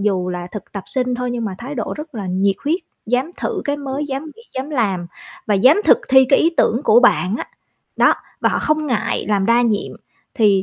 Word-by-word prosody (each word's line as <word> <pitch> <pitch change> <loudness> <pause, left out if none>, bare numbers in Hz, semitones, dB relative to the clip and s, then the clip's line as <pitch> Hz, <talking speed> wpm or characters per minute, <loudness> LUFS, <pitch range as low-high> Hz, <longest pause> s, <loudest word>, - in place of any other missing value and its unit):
dù 190 -3 0
là 175 -1 -4
thực 210 -4 -8
tập 200 -2 -5
sinh 250 -1 -1
thôi 250 0 -3
nhưng 240 -1 -3
mà 200 -3 -3
thái 265 +5 -6
độ 230 -5 -3
rất 300 -2 -9
là 205 -3 -5
nhiệt 190 +2 +1
huyết, 330 +6 +1 0.3
dám 250 +7 0
thử - - -3
cái 285 -1 -1
mới, 280 0 -4
dám 275 +1 -4
nghĩ 460 - -15
dám 265 +3 -4
làm, 200 - -1 0.4
và 210 - +2
dám 260 - +5
thực - - +6
thi 265 0 +7
cái 275 - +5
ý 330 - +3
tưởng 235 - +2
của 225 +3 +6
bạn 215 -5 +3
á, - - -5 0.5
đó, - - +5 0.3
và - - +3
họ - - 0
không 305 0 0
ngại 245 -6 -1
làm 200 -2 +1
đa 235 +1 +4
nhiệm. 215 -3 0 0.4
Thì 205 -5 +3
240 Hz, 230 wpm, -19 LUFS, 200-275 Hz, 0.5 s, thi